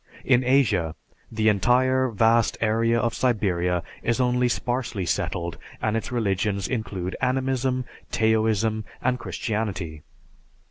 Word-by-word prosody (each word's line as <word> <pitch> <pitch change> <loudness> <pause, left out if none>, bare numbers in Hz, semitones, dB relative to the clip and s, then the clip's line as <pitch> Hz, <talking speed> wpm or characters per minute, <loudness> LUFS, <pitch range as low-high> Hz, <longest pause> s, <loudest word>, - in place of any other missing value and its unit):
In 130 -1 +4
Asia, 115 - +2 0.4
the 110 -1 0
entire 125 +5 +3
vast 115 +1 +3
area 115 +1 +2
of 115 0 0
Siberia 90 -8 0 0.2
is 115 +2 0
only 125 0 +2
sparsely 120 -6 -2
settled 85 0 -2 0.2
and 110 0 0
its 115 - -3
religions 100 -4 0
include 100 -6 -3
Animism, 130 0 0 0.3
Taoism, 110 -1 +1 0.2
and 125 0 +1
Christianity. 100 -11 -3
115 Hz, 110 wpm, -25 LUFS, 100-125 Hz, 0.4 s, In